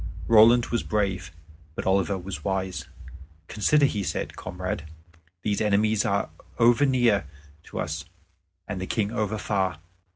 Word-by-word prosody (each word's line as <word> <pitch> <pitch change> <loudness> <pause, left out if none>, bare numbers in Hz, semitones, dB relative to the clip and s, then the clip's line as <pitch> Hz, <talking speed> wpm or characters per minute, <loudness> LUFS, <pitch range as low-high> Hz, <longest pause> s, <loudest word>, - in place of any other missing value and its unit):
Roland 115 +2 +7
was 120 - +2
brave, 95 -3 -1 0.4
but - - -4
Oliver 95 0 +2
was 90 -5 -7
wise. 95 -1 -2 0.6
"Consider," 145 +7 +3
he 105 -7 0
said, 95 - -3
"comrade. - - -5 0.6
These 105 -1 0
enemies 105 0 +2
are 100 0 0 0.3
over 120 +4 +5
near 120 - +2 0.4
to - - -7
us, 75 +1 -3 0.6
and 95 -2 -4
the 95 - -4
King 105 -2 -1
over 110 -2 -1
far. 95 -4 -1
100 Hz, 135 wpm, -26 LUFS, 95-110 Hz, 0.6 s, Roland